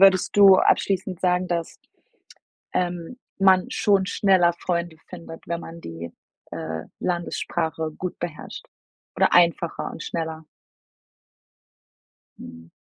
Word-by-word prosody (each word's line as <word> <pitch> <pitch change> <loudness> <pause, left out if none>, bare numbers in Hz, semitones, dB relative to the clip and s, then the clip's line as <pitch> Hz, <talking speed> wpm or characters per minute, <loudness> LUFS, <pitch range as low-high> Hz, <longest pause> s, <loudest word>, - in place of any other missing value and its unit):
würdest 195 -1 +5
du 195 -2 +9
abschließend 190 -2 +1
sagen, 180 0 +1
dass, 170 -1 -3 1.0
ähm, 175 +5 -2 0.2
man 190 -1 +4
schon 195 -2 +2
schneller 190 -4 +3
Freunde 170 -2 -3
findet, 165 -2 -10
wenn 170 0 -3
man 165 0 -9
die, 85 0 -7 0.4
äh, 80 -1 -4 0.2
Landessprache 165 -2 -2
gut 180 -1 -5
beherrscht, 165 -3 -7 0.5
oder - - +3
einfacher 170 -1 +2
und - - -8
schneller? 160 -1 -4 1.9
Mhm. 80 0 -12
175 Hz, 110 wpm, -24 LUFS, 160-185 Hz, 1.9 s, du